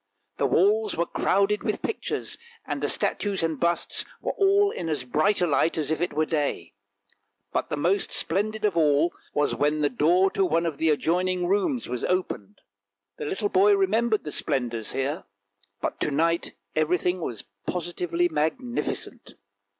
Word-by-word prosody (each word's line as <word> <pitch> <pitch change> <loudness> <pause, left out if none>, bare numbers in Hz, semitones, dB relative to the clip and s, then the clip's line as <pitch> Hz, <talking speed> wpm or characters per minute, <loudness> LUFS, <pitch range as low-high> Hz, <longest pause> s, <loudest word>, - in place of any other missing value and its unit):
The - - +2
walls 210 +2 +2
were 170 - +2
crowded 200 +4 +1
with 215 - -2
pictures, 450 - -3 0.3
and - - -3
the - - 0
statues 200 -4 0
and 160 -3 -1
busts 170 0 +1 0.2
were - - -2
all 400 +1 +3
in 170 -2 -4
as 150 -5 -1
bright 155 +11 +1
a - - +4
light 165 +1 +2
as 155 -1 -1
if 160 - -1
it 175 - 0
were 155 +1 +1
day; 145 - -2 0.8
but - - -1
the - - -2
most 185 +7 +1
splendid 215 +5 -1
sight - - +5
of 185 - -15
all 155 +1 +3 0.2
was 145 0 +2
when 150 +1 +1
the 145 - +2
door 175 +9 +3
to 195 - +1
one 170 -1 +1
of 155 -4 -3
the 160 - +2
adjoining 180 +4 +1
rooms 205 - 0
was 125 -1 -4
opened. 105 - -2 0.6
The - - -3
little 205 +7 -1
boy 200 +2 +5
remembered 215 +3 +1
the 150 - -5
splendours 120 -6 -2
here, 140 +4 -2 0.6
but - - -3
to - - 0
night 165 +4 0 0.2
everything 180 +3 +1
was 115 -9 -4 0.2
positively 175 0 -1
magnificent. 175 - -3
170 Hz, 170 wpm, -26 LUFS, 150-195 Hz, 0.8 s, sight